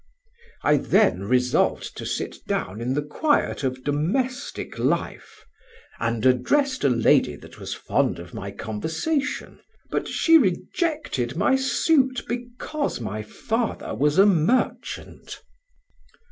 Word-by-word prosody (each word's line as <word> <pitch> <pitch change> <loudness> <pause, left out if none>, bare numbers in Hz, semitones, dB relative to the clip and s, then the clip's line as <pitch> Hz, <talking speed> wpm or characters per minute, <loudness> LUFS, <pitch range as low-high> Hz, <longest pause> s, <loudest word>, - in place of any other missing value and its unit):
I 150 +1 +4
then 95 -7 +2
resolved 125 +3 +1
to - - -5
sit - - -3
down 100 +5 -2
in 125 +3 -1
the 145 - 0
quiet 290 - 0
of 130 -1 -2
domestic 190 - -2
life, - - -2 0.5
and 115 0 -1
addressed 260 - +2
a 140 - +4
lady 115 -2 +3
that - - -14
was - - -5
fond - - 0
of 85 0 -10
my 100 - -5
conversation, 160 - -3 0.3
but - - -1 0.2
rejected 300 - +2
my 230 +10 +3
suit 265 -1 +2
because 245 - -3
my 110 -2 -4
father 225 - -3
was 145 +7 +1
a 195 - +8
merchant. 200 +5 0
155 Hz, 120 wpm, -24 LUFS, -, 0.5 s, a